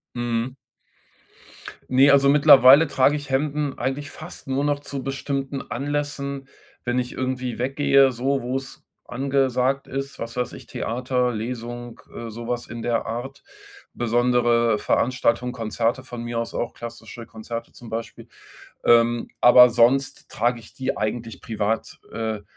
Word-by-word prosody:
Mhm. 120 +1 -2 1.4
Ne, 135 +2 +6
also 140 0 +5
mittlerweile 140 +1 +8
trage 140 0 +2
ich 145 -1 -8
Hemden 145 +1 -1
eigentlich 140 +2 -3
fast 155 +3 -10
nur 135 +1 -1
noch 145 -1 +1
zu 140 -1 -6
bestimmten 135 0 -3
Anlässen, 140 0 -3 0.4
wenn 120 +1 0
ich 125 0 -5
irgendwie 130 -2 -3
weggehe, 135 +1 +3
so 135 +2 -1
wo's 135 +2 -5 0.2
angesagt 135 0 0
ist, 135 +1 -5
was 115 +1 -6
weiß 125 -1 -2
ich, - - -11
Theater, 125 +2 -1
Lesung, 120 +1 -6
äh, 115 -1 -6
so 115 +2 -8
was 120 0 -3
in 115 -1 -7
der 115 -1 -1
Art. 120 +4 -6 0.5
Besondere 120 -1 +2
Veranstaltungen, 125 +1 +1
Konzerte 115 +1 -2
von 120 -2 -7
mir 120 0 -4
aus 115 0 -4
auch, 120 - -3
klassische 120 0 -9
Konzerte 115 +1 -7
zum 120 -2 -12
Beispiel. 115 +1 -6 0.6
Ähm, 120 0 +4
aber 125 0 +8
sonst 125 +3 +2
trage 120 +1 0
ich 105 - -15
die 130 - -3
eigentlich 115 +1 -4
privat. 110 0 -2
Äh, 110 -2 -3
125 Hz, 140 wpm, -23 LUFS, 115-135 Hz, 1.4 s, mittlerweile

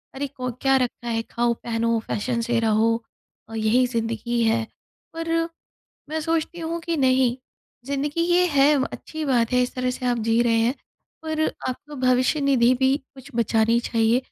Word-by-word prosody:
अरे 280 +1 -2
को 255 -2 -5
क्या 270 0 +4
रखा 245 -1 -2
है, 225 -1 0
खाओ 235 +1 0
पहनो 230 0 -1
फैशन 235 +3 -1
से 235 0 0
रहो 225 0 +2 0.5
अ, - - -10
यही 225 +4 +3
ज़िंदगी 230 0 -2
है। 225 0 +2 0.5
पर, 330 0 -3 0.8
मैं 315 +1 -2
सोचती 330 +2 -2
हूँ 335 +1 -3
कि 335 -1 -2
नहीं, 260 -2 +3 0.5
ज़िंदगी 285 +3 -2
ये 350 +1 +3
है 290 -1 +4 0.2
अच्छी 315 -1 -6
बात 245 -3 +1
है, 250 0 +4
इस 250 - -3
तरह 255 0 -1
से 250 0 -4
आप 240 -1 +1
जी 230 +1 +3
रहे 230 -1 +2
हैं। 235 +4 +2 0.5
पर 315 -1 -3 0.3
आपको 295 +4 -6
भविष्य-निधि 255 0 +3
भी 265 +1 +3 0.2
कुछ 265 +2 -13
बचानी 230 0 +2
चाहिए 230 0 +2
250 Hz, 170 wpm, -23 LUFS, 230-285 Hz, 0.8 s, क्या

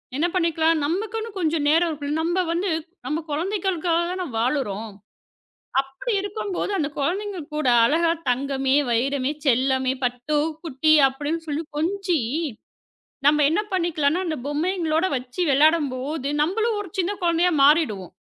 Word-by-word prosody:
என்ன 300 +5 +1
பண்ணிக்கலாம்? 330 -2 +2
நமக்குன்னு 435 +7 -2
கொஞ்சம் 320 -4 0
நேரம் 330 +3 +3
இருக்கும். 295 -1 -3
நம்ப 345 +3 0
வந்து 355 +2 0 0.3
நம்ப 305 +1 -1
குழந்தைகளுக்காக 345 +1 0
தான 365 0 -3
வாழுறோம். 225 -4 -1 0.9
அப்டி 270 - -6
இருக்கும்போது 405 -1 -3
அந்தக் 295 -3 -3
குழந்தைங்க 385 +7 -2 0.2
கூட 305 -4 -1 0.2
அழகா 330 +6 +2 0.2
தங்கமே, 270 +1 0 0.2
வைரமே, 265 +3 0
செல்லமே, 260 0 +2
பட்டு, 250 +4 -1 0.3
குட்டி 310 +1 +2
அப்டின்னு 295 +5 -4
சொல்லி 300 +2 -2
கொஞ்சி, 360 +1 0 1.1
நம்ம 300 0 +4
என்ன 335 +7 +1
பண்ணிக்கலானா 335 -2 +1
அந்தப் 310 -7 -4
பொம்மையங்களோட 325 +2 0
வச்சு 250 +7 -6
விளையாடம்போது 285 -1 +1
நம்பளும் 435 +7 0
ஒரு 385 - -9
சின்னக் 375 +2 -1
குழந்தையா 345 +1 +3
மாறிடுவோம். 275 - +3
315 Hz, 125 wpm, -23 LUFS, 275-355 Hz, 1.1 s, நம்ம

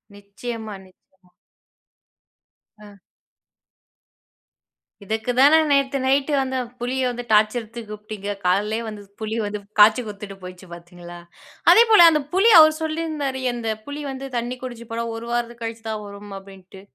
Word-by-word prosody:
நிச்சயமா, 215 +2 -7
நிச்ச 185 0 -26 1.5
ஆ. 205 - -13 2.1
இதுக்கு 220 +4 -2
தான 295 +4 +7
நேத்து 275 -1 +2
நைட்டு 275 +2 +1
அந்த 260 0 -2 0.2
புலிய 255 +2 -2
வந்து 245 0 -5
டார்ச்சர் 215 +3 +3
எடுத்து 230 +2 -10
கூப்ட்டிங்க 210 -1 -6
காலையிலேயே 210 +5 +1
வந்து 210 -1 -8 0.2
புலி 220 0 -4
வந்து 205 0 -4 0.2
காய்ச்சி 215 +3 +7
குடுத்துட்டு 200 -1 -8
போயிச்சு 180 +1 -11
பார்த்தீங்களா. 175 0 -12 0.5
அதேபோல 440 -6 +7
அந்த 305 - +1
புலி 390 +5 +4
அவரு 310 0 +7
சொல்லியிருந்தாரு. 310 -4 -3
அந்த 230 -2 -4 0.2
புலி 285 +1 -6
வந்து 270 +1 -7
தண்ணி 240 +2 -3
குடிச்சி 240 -2 -8
போனா 230 0 -2
ஒரு 230 +1 -8
வாரத்துக்கு 235 0 -3
கழிச்சி 225 0 -6
தான் 215 -1 -4
வரும் 200 0 -10
அப்டின்ட்டு. 195 -1 -15
225 Hz, 135 wpm, -22 LUFS, 205-265 Hz, 2.1 s, தான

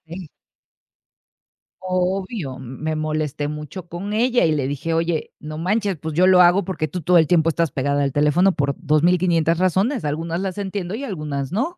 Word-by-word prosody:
molesté. 180 -5 -9 1.5
Obvio, 185 - -2
m 130 - -10 0.2
me 155 0 -1
molesté 155 -1 -2
mucho 150 +4 -7
con 195 +5 -5
ella 240 -1 +2
y 160 - +2
le 140 -3 0
dije: 145 +4 -3
"Oye, 165 -1 -1
no 155 0 -7
manches. 195 +1 0
Pues 155 +1 -5
yo 185 +2 +4
lo 185 -1 +7
hago 175 +3 +5
porque 165 -5 -2
tú 180 +4 -5
todo 175 +3 +4
el 160 -2 +4
tiempo 165 -1 +3
estás 165 -1 0
pegada 140 +1 0
al 140 - 0
teléfono 150 +6 +3
por 140 -1 0
2500 165 +1 +2
razones. 190 - +1
Algunas 165 +3 -2
las 190 0 -4
entiendo 195 -1 -4
y 275 - -6
algunas 150 - -4
no". 270 - -2
170 Hz, 185 wpm, -21 LUFS, 150-185 Hz, 1.5 s, lo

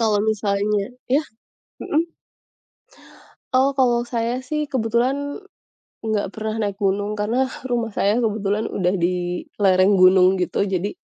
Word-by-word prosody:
kalau 215 -2 +2
misalnya 205 +2 -1 0.2
Ya? 285 +4 +3 0.6
Heeh? 330 +2 -1 1.4
Oh 270 +2 +3
kalau 240 -2 +3
saya 235 +1 -1
sih 305 0 -1
kebetulan, 260 - -1 0.6
enggak 220 -2 -1
pernah 220 0 -3
naik 200 -1 -2
gunung. 200 +1 0
Karena 235 +6 +1 0.2
rumah 235 -2 -1
saya 205 +4 +2
kebetulan 215 -2 0
udah 180 0 0
di 180 0 -1 0.2
lereng 190 +1 +4
gunung, 185 0 +7
gitu. 200 +2 0
Jadi 185 +3 0
215 Hz, 125 wpm, -22 LUFS, 200-245 Hz, 1.4 s, gunung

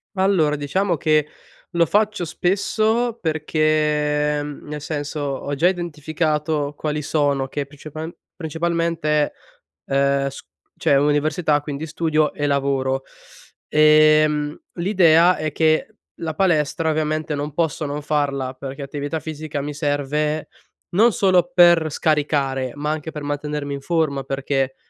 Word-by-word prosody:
Allora, 185 -6 +2
diciamo 170 +5 0
che 155 0 +2 0.5
lo 170 -2 +3
faccio 210 -1 +1
spesso 215 +7 0
perché 150 -2 +1
ehm, 145 0 -6
nel 150 0 -6
senso 145 0 -4
ho 140 0 -3
già 170 +6 +4
identificato 155 -3 -2
quali 150 0 -2
sono 140 -2 0
che 145 +1 -4
principa 155 +3 -8 0.3
principalmente, 165 -2 0 0.5
ehm, 140 0 +1
s - - -10 0.4
c'è - - +2
università, 150 +2 +2
quindi 145 +1 -5
studio 155 -1 0
e 145 - -2
lavoro. 135 -1 0 0.6
Ehm, 155 0 +4 0.2
l'idea 175 -2 +4
è 155 0 -2
che 155 +1 +2 0.3
la 160 -1 -4
palestra, 160 -3 +1
ovviamente, 155 0 -1
non 145 +1 -4
posso 160 -1 -1
non 145 +1 -4
farla 140 -3 -1
perché 135 +2 -8
attività 145 +3 -4
fisica 155 -2 -5
mi 145 +1 -4
serve 150 +1 -1 0.4
non 225 +6 +5
solo 180 -3 +2
per 170 -3 +5
scaricare, 140 -4 0
ma 150 +1 -2
anche 155 +1 -4
per 150 -1 -7
mantenermi 145 0 -3
in 140 - -5
forma, 155 -4 0
perché, 135 -1 -1
150 Hz, 130 wpm, -21 LUFS, 145-160 Hz, 0.6 s, non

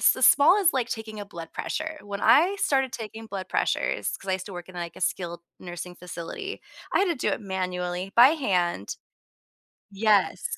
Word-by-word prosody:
the - - -7
small 295 +7 +7
as 385 -5 +5
like 255 -3 0
taking 220 -3 -5
a 205 - -6
blood 170 -5 -9
pressure. 315 0 -4
When 200 0 -6
I 360 +7 +5
started 270 -6 +1
taking 225 -1 -7
blood 195 -3 -6
pressures- - - 0
‘cause 195 - -9
I - - +2
used 185 0 -3
to 200 - -9
work 175 0 -8
in, 185 - -12
like, 170 -1 -5
a - - -11
skilled 175 -1 -2 0.2
nursing 175 0 -7
facility- 180 - -7 0.3
I - - +4
had 390 - +4
to 345 -3 0
do 250 - -1
it - - -2
manually 180 -1 -3
by 245 +3 +9
hand. 180 - 0 1.0
Yes. 205 -1 +2
200 Hz, 195 wpm, -26 LUFS, 180-255 Hz, 1.0 s, by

